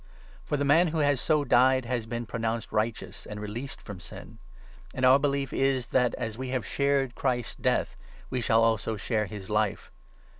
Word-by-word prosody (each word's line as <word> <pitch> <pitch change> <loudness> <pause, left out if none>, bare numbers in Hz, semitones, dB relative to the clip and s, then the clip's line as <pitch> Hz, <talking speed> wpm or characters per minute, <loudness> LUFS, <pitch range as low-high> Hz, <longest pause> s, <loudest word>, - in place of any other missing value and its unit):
For 150 - -2
the 145 - 0
man 160 +5 +5
who 160 0 -2
has 145 -4 +2
so 155 -2 +2
died 130 -1 +4
has 115 -2 -2
been 120 +1 -4
pro 115 - -5
7 - - -6 0.2
nounced - - -14
righteous 110 +1 -3
and 105 0 -6
released 115 +6 -6
from 100 -4 -8
Sin. 85 - -11 0.6
And 130 - +1
our 130 +2 +7
belief 140 -2 -1
is, 135 -3 +1
8 - - -24
that, 125 -2 +2
as 110 +1 -5
we 130 -1 -4
have 130 -1 -2
shared 140 -2 +1
Christ's 125 -3 -1
Death, - - 0 0.4
we 125 - -1
shall 115 0 +3
also 110 -1 +1
share 105 0 -1
his 95 -1 -8
Life. 105 -2 -1
125 Hz, 200 wpm, -28 LUFS, 110-135 Hz, 0.6 s, our